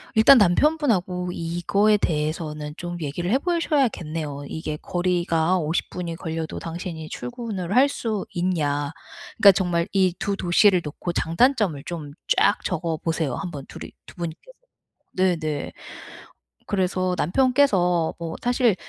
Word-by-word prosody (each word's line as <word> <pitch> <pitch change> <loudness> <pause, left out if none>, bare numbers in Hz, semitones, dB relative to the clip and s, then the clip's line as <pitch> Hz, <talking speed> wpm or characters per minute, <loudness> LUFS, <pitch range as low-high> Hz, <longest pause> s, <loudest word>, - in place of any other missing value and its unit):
일단 235 +5 +8
남편분하고 190 - +2
이거에 175 +6 +1
대해서는 150 -2 -2
좀 175 0 -5
얘기를 170 +6 -3
해 260 - +4
보셔야겠네요. 185 - -1
이게 155 -1 -4
"거리가 175 -1 +1
50 160 +1 -1
분이 170 -2 -4
걸려도 160 -1 -4
당신이 165 -1 -6
출근을 220 -6 -5
할 270 +3 +6
수 220 -7 -3
있냐?" 150 -5 0 0.5
그러니까 200 - +9
정말 175 -3 0
이 185 -3 +3
2 200 -1 -1
도시를 180 0 +4
놓고 160 +3 -5
장단점을 190 - +2
좀 155 -5 -6 0.3
쫙 - - +3
적어 165 -2 -2
보세요 160 -6 -2
한 180 -3 -5
번 140 -3 -7
2 - - -9
이 - - -9 0.2
2 - - -13
분께서. 170 - -7 0.6
네네. 170 -5 0 0.9
그래서 185 -1 0
남편께서 185 - +2
뭐 165 -1 -5
사실 245 -4 +3
175 Hz, 275 characters per minute, -24 LUFS, 160-200 Hz, 0.9 s, 그러니까